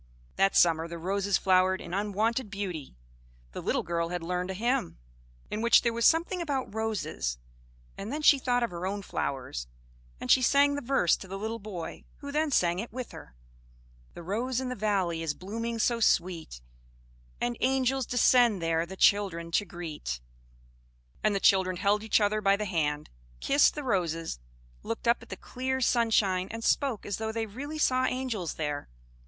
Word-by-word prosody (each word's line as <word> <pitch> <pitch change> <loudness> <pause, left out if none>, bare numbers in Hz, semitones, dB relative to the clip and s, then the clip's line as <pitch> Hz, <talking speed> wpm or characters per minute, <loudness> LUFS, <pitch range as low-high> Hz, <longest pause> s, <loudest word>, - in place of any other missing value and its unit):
That 195 0 +2
summer 165 -1 +4
the 170 0 -7
roses 195 +3 0
flowered 185 0 +3
in - - -8
unwonted 210 +4 0
beauty. 185 - -5 0.6
The - - -6
little - - 0
girl 170 -1 -1
had 175 -1 -4
learned 180 +2 -2
a 190 - -3
hymn, 230 - -1 0.5
in 215 - -2
which 235 +1 +5
there 235 - +1
was 235 0 0
something 340 +2 +2
about 280 -9 -2
roses; 215 - -2 0.6
and 200 +4 -5
then 300 +2 -3
she 285 -2 +7
thought 245 -1 +1
of 235 - -1
her 175 +1 -4
own 200 +1 -3
flowers; 125 - -4 0.5
and - - -1
she 260 - +6
sang 285 +3 +4
the 285 - -3
verse 250 - +2
to 190 - -10
the 195 +1 -5
little 220 +3 -4
boy, 195 -6 -7
who 285 -1 -7
then 305 +1 +1
sang 175 -9 +2
it 230 - -5
with 250 +1 -6
her: - - -12 0.8
"The 170 - -8
rose 235 +8 -1
in 260 -1 -3
the 250 - -3
valley 190 -6 0
is 155 -3 -2
blooming 230 +5 -4
so 235 +1 +1
sweet, 170 - 0 0.8
And 120 0 -1
angels 265 0 +1
descend 245 -3 +4
there 165 0 0
the 190 +2 -9
children 185 -6 +2
to 205 - +1
greet." 160 - -6 1.0
And 210 -1 +2
the - - +1
children 190 -2 +3
held 205 +2 +2
each 220 - +3
other 215 0 +1
by 195 0 +4
the 210 +1 -3
hand, 150 -5 -1 0.3
kissed 285 +1 +4
the 295 - -4
roses, 165 - -1 0.4
looked 230 +1 -5
up 235 - +3
at - - -14
the - - -6
clear 260 +1 -3
sunshine, 220 -7 +2
and 225 0 -6
spoke 265 -4 +1
as 205 - -3
though 220 0 -3
they 225 0 -2
really 275 +9 -7
saw 255 -3 +2
angels 255 -9 -2
there. 145 - -3
205 Hz, 180 wpm, -29 LUFS, 175-240 Hz, 1.0 s, she